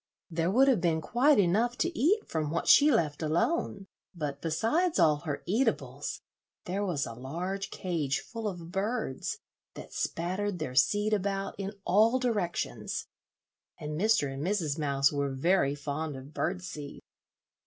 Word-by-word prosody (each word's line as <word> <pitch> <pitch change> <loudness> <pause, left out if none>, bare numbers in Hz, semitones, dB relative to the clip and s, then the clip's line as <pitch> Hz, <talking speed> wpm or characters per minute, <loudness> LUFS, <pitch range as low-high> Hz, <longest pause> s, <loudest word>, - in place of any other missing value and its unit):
There 165 +1 0
would 260 +8 +5
have 250 -9 +4
been 165 -2 +2
quite 250 - +3
enough 215 +6 +2
to 345 +3 -1
eat 400 +10 +2
from 155 -2 -2
what 165 +2 -2
she 295 +1 +7
left 160 - +1
alone; 195 - 0 0.3
but 145 -4 -4
besides 230 - +1
all 150 -2 +5
her 145 0 -5
eatables, 220 +9 -1 0.4
there 195 +3 -2
was 175 -8 -1
a 115 - -6
large 175 +11 -4
cage 155 -7 -1
full 225 -2 -5
of 175 -4 -6
birds, 205 - -2 0.4
that - - -10
spattered 185 +3 -2
their 155 -6 -4
seed 205 +11 +3
about 195 -1 -1
in 195 +1 -3
all 220 +6 +4
directions, 215 -9 -2 0.7
and 150 - -6
Mr. 160 -4 +2
and 135 - -5
Mrs. 165 -5 -1
Mouse 140 -1 +2
were 140 -1 -1
very 140 +1 +2
fond 145 +1 -4
of 135 +3 -10
bird 180 +3 -2
seed. 150 -5 -7
175 Hz, 155 wpm, -29 LUFS, 150-210 Hz, 0.7 s, she